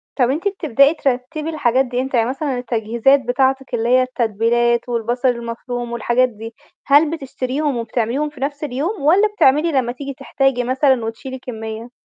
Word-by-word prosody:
طَب 250 -3 +2
أنتِ 315 +9 -1
بتبدئي 290 - +3
ترتّبي 290 +2 -2
الحاجات 265 -4 +1
دي 250 0 -2
إمتى؟ 265 -1 -2
يعني 230 +1 +2
مثلًا 270 0 -2
التجهيزات 235 +2 +2
بتاعتِك، 265 +1 0
اللي 235 0 0
هي 255 +1 +5
التتبيلات 235 0 0
والبصل 240 +2 -1
المفروم 240 0 -3
والحاجات 240 +2 +1
دي، 225 0 -10 0.3
هل 290 +2 +5
بتشتريهم 275 -2 -3
وبتعمليهم 235 +5 -1
في 295 -2 -15
نَفْس 285 +2 -3
اليوم 300 - -3
والَّا 360 +9 +4
بتعملي 330 -5 +3
لمّا 260 -4 0
تيجي 275 +3 -7
تحتاجي 270 -1 0
مثلًا 260 -1 +2
وتشيلي 260 +4 -6
كمّية؟ 225 -2 -7
255 Hz, 160 wpm, -19 LUFS, 235-280 Hz, 0.3 s, هي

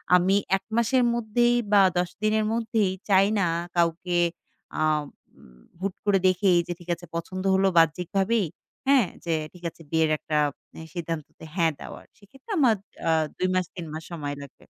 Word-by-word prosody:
আমি 185 +2 +4 0.2
১ - - -17
মাসের 245 +2 +3
মধ্যেই 240 +1 +2 0.2
বা 200 - +8 0.2
১০ 180 0 +1
দিনের 215 0 +2
মধ্যেই 220 -4 +1 0.2
চাই 195 0 +5
না 180 - +2 0.3
কাউকে 175 +1 +1 0.6
আ - - 0 1.0
হুট 195 -1 -1
করে 200 -2 +4
দেখেই 185 -1 +3
যে 175 - -2
ঠিক 175 - -14
আছে 175 - -13
পছন্দ 185 +3 -4
হলো 195 0 +3
বাহ্যিকভাবেই। 180 +6 +2 0.4
হ্যাঁ? 265 -8 +5 0.2
যে 170 - 0 0.2
ঠিক 180 - -16
আছে 165 - -19
বিয়ের 160 -1 +3
একটা 150 0 -2 0.6
সিদ্ধান্ততে 165 -3 -6
হ্যাঁ 165 -3 +3
দেওয়ার। - - -10
সেক্ষেত্রে 270 - -14
আমার 240 -6 +5 0.3
আ - - +5 0.3
২ 185 - +1
মাস 185 -1 +1
৩ 175 -3 -6
মাস 160 - -6
সময় 145 -4 -4
লাগবে। 140 -2 -13
185 Hz, 160 wpm, -26 LUFS, 170-215 Hz, 1.0 s, বা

